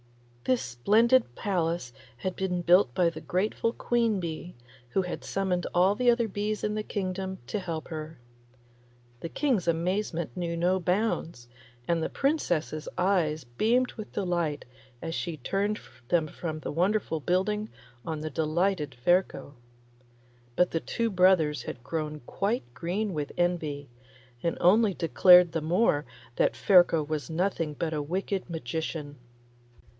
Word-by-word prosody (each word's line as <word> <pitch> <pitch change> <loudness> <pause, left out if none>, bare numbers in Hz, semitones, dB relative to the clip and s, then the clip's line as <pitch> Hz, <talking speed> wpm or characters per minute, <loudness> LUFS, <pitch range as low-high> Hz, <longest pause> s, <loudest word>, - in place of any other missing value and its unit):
This 255 -1 +2
splendid 210 - +3
palace 170 -9 -1 0.2
had 185 +7 -3
been 180 -2 -2
built 175 -7 +4
by 175 -2 +3
the 160 -1 -9
grateful 210 +6 0
queen 230 -3 +1
bee, 170 0 -5 0.3
who 190 +8 +1
had 180 - -5
summoned 185 -2 -1
all 185 +3 +5
the 245 +3 +2
other 235 -1 +3
bees 210 +1 -3
in 210 - 0
the 215 - -1
kingdom 190 -2 -3
to 210 - -3
help 165 -4 -5
her. 155 0 -6 1.0
The 165 - -5
King's 245 - 0
amazement 170 - -1
knew 170 -1 -2
no 180 +2 +2
bounds, 180 - -1 0.4
and 170 -1 +1
the - - -1
Princess's 175 - -1
eyes 170 -5 +1
beamed 225 - +1
with 215 -2 -8
delight 175 -6 -1 0.4
as 165 0 -3
she 170 -1 -3
turned 200 +9 -1 0.3
them 165 0 +2
from 155 0 -5
the - - -4
wonderful 180 0 0
building 200 +6 0 0.3
on 160 -2 -4
the 155 0 -4
delighted 155 -1 0
Ferko. 175 +2 +1 1.0
But 180 +5 +3
the 165 - 0
two 230 -1 -1
brothers 180 -5 +4
had 120 - -7
grown 155 0 -4
quite 200 - -1
green 190 - -2
with 150 -3 -3
envy, 160 -5 -1 0.5
and 170 - -1
only 200 +2 +4
declared 180 +1 +6
the 165 - -2
more 155 -2 +2 0.3
that - - +2
Ferko 175 -4 +5
was 155 0 -3
nothing 165 -2 -1
but 160 +2 -2
a 150 - -1
wicked 185 +5 -3
magician. 160 0 -4
175 Hz, 145 wpm, -28 LUFS, 155-200 Hz, 1.0 s, declared